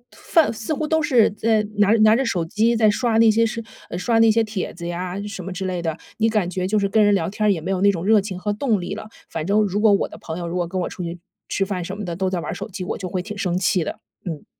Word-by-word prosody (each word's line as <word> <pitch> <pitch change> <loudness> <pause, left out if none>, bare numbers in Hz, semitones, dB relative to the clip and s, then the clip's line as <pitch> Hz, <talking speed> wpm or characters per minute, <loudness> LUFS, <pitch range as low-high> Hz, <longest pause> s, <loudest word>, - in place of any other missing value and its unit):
饭 320 -8 +2
似 220 +6 -6
乎 305 +1 -2
都 320 0 +2
是 250 -9 +4
在 215 0 +1 0.2
拿 205 0 +5
着 225 - +5
拿 215 +1 +6
着 270 - +1
手 180 -9 -1
机 220 +6 +1
在 215 -2 +4
刷 230 0 +1
那 225 -1 +6
些 230 +2 +3
视 230 0 -2 0.3
呃， 175 - -4
刷 225 +5 +1
那 225 0 +6
些 225 +1 +3
帖 210 -3 -4
子 170 0 -6
呀， 180 +2 -4
什 195 -3 -6
么 190 - -6
之 190 +1 -4
类 180 -2 -2
的， 165 -1 -2 0.2
你 225 0 +2
感 210 -5 +1
觉 185 0 -2
就 215 +2 +1
是 200 -1 +2
跟 215 +2 +3
人 205 -1 +4
聊 165 - 0
天 210 +2 -1
儿， - - +6
也 175 - 0
没 180 +5 -4
有 190 -1 -1
那 200 0 +5
种 175 -1 -4
热 215 -1 +5
情 190 -2 -6
和 205 +2 -2
动 215 -3 0
力 175 - -4
了， 215 - -8 0.2
反 160 - -3
正 210 +2 +3
如 205 0 0
果 220 -2 +5
我 200 - +2
的 - - -12
朋 160 +1 -6
友， 170 -1 -4
如 170 - -4
果 175 -2 0
跟 185 +1 -3
我 - - -1
出 - - -8
去 170 0 -4 0.3
吃 195 - 0
饭 185 -3 -3
什 190 +4 -6
么 210 - -5
的， 170 -1 -4
都 190 +1 0
在 180 -2 -2
玩 - - -4
儿 - - -3
手 - - -6
机， 190 -1 -6
我 - - -4
就 185 -1 -5
会 180 0 -2
挺 210 +1 -7
生 180 -3 -1
气 185 -1 +1
的， - - -5 0.3
嗯。 160 -4 -5
200 Hz, 340 characters per minute, -22 LUFS, 180-220 Hz, 0.3 s, 拿